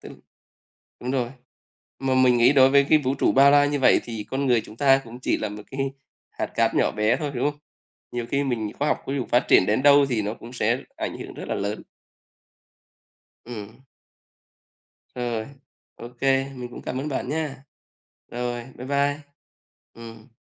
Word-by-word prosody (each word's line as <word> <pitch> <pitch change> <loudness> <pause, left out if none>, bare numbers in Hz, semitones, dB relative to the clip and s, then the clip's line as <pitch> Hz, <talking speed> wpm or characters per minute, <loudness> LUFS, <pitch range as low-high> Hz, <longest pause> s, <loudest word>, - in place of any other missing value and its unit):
t - - -12 0.9
Đúng 125 - -4
rồi, 125 -3 -1 0.7
mà 135 -1 0
mình 125 -1 +4
nghĩ 120 +4 +5
đối 135 -2 +6
với 140 0 +5
cái 155 - +7
vũ 135 -2 -1
trụ - - +2
bao 140 +1 +6
la 145 0 +6
như 145 0 -1
vậy 130 - +5
thì 115 -3 -6
con 135 +1 -1
người 120 -3 +3
chúng 110 - -13
ta 135 0 +4
cũng 120 +1 -11
chỉ - - 0
là 110 - -3
một 105 0 -9
cái 135 0 -2 0.4
hạt - - -3
cát - - 0
nhỏ - - +2
bé 105 +3 +1
thôi, 150 -3 -3
đúng 135 +4 +1
không? 145 - -21 0.5
Nhiều 120 -1 -3
khi 140 +2 +1
mình 115 -6 -2
khoa 145 - +1
học - - 0
ví 135 - -2
dụ 130 -4 -2
phát 120 - +2
triển - - +6
đến 110 +7 +1
đâu 145 0 +7
thì 115 -4 0
nó 105 +1 -3
cũng 120 +1 -12
sẽ 120 +1 +1 0.2
ảnh - - -4
hưởng - - -8
rất - - -8
là - - -2
lớn. 100 +2 -3 1.6
Ừm. 110 0 -9 1.3
Rồi, 120 -3 -3 0.5
ô 120 - -9
kê, 135 0 +2
mình 125 -1 -7
cũng - - -10
cảm 130 - -4
ơn 135 +3 -3
bạn 130 -2 -3
nhá. 145 -3 -3 0.6
Rồi, 120 0 -4
bye 125 +1 -8
bye. 140 +1 +1 0.7
Ừm. 115 +1 -12
130 Hz, 195 wpm, -24 LUFS, 115-140 Hz, 1.6 s, cái